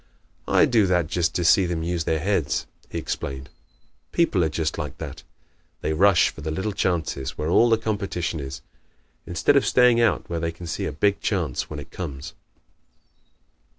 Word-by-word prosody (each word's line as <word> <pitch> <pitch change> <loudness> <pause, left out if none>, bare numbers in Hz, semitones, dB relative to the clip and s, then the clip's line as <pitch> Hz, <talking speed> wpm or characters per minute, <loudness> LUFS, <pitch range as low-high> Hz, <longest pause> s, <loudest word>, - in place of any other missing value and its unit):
"I - - +5
do 110 -5 +3
that 90 -2 +2
just 85 +1 -1
to 90 - 0
see 95 +2 +5
them 85 -2 -2
use 85 -1 -2
their 80 - +1
heads," 80 -6 0 0.2
he - - -5
explained. 70 0 -5 0.6
"People 110 - +2
are 80 - +1
just 80 0 -2
like - - -5
that. - - -7 0.6
They 80 - -1
rush 95 +1 +5
for - - -11
the 80 - -4
little 95 +7 -2
chances 80 -8 -2
where 75 - -2
all 120 +7 +5
the 115 - +4
competition 100 -7 -2
is, 70 -2 -7 0.6
instead 90 +11 +2
of 140 - +5
staying 125 -2 +4
out 115 -5 +2
where 85 -1 -3
they 85 0 -1
can 85 +1 -10
see 80 - -3
a - - -3
big 100 +7 +1
chance 85 - -1
when - - -6
it - - -9
comes." 75 -5 -6
85 Hz, 185 wpm, -24 LUFS, 80-100 Hz, 0.6 s, I